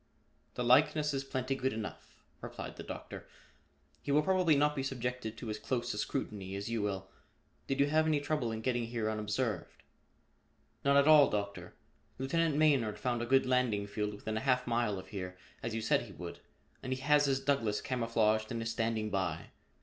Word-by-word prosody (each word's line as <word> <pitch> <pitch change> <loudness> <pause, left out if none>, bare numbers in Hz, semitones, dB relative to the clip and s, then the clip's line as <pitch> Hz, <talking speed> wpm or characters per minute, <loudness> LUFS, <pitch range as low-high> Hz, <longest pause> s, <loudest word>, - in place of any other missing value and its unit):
"The 125 - -1
likeness 150 +4 +4
is 135 0 -1
plenty 130 -1 -2
good 130 0 -1
enough," 110 -1 -7 0.2
replied - - -7
the - - -8
Doctor. - - -8 0.7
"He - - -3
will 150 +2 +4
probably 185 -3 +3
not 150 +1 +3
be 135 - -1
subjected 125 -4 -3
to 115 -4 -5
as 105 - -4
close 120 +1 -2
a - - -6
scrutiny 100 -2 -3
as 100 +3 -4
you 115 -2 0
will. 95 -2 -3 0.6
Did 135 0 -1
you 140 - +6
have 155 +2 +2
any 155 -2 +3
trouble 145 -5 -1
in 110 0 -4
getting 120 -1 0
here 115 -2 -1
unobserved?" 110 +1 -3 1.0
"None 140 0 +4
at 140 +1 +5
all, 155 -2 +8
Doctor. 100 -1 -4 0.4
Lieutenant 155 +4 +1
Maynard 140 -8 +3
found 120 -2 -1
a 120 - -3
good 135 +1 +4
landing 125 -5 +1
field 105 0 -3
within 110 +1 -4
a - - -2
half 125 -2 +2
mile 115 -4 0
of 95 - -9
here, 90 -3 -6 0.2
as 115 -1 -3
you 115 - -1
said - - +3
he - - -10
would, - - -8 0.4
and 130 - -5
he 130 - -5
has 145 +1 +4
his 135 -1 +2
Douglass 135 -7 +1
camouflaged 115 -2 +1
and 115 - -2
is 115 - -2
standing 110 -2 -1
by. 90 -5 -2
120 Hz, 195 wpm, -33 LUFS, 110-140 Hz, 1.0 s, all